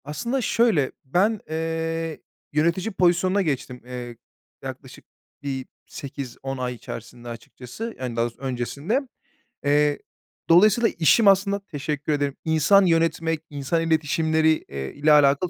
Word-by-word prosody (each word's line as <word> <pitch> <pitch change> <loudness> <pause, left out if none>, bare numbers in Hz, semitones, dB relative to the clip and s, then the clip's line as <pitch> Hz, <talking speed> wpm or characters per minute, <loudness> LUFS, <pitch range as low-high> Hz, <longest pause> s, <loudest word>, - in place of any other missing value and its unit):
Aslında 235 - -2
şöyle, 220 - +2
ben, 200 +10 +2
eee, 165 0 -2 0.3
yönetici 170 +7 +1
pozisyonuna 185 +1 +2
geçtim, 135 -6 -3
eee, 125 -1 -7 0.5
yaklaşık - - -9 0.4
bir 135 -2 -3 0.2
8-10 135 -1 -6
ay 125 -1 -2
içerisinde 120 +1 -9
açıkçası, 125 - -8
yani 125 -2 -4
daha 115 0 +1
doğrusu 120 +2 -8
öncesinde. 140 - -1 0.6
Eee, 145 0 +3 0.5
dolayısıyla 210 +7 +6
işim 200 +7 +5
aslında 200 +1 +4
-teşekkür 150 -5 -4
ederim 145 -1 -1
insan 160 +5 +5
yönetmek, 165 -1 +1
insan 145 +3 -1
iletişimleri, 160 0 +2 0.2
eee, 70 -1 -5
ile 150 +2 +2
alakalı 145 +3 +5
155 Hz, 120 wpm, -24 LUFS, 135-175 Hz, 0.6 s, dolayısıyla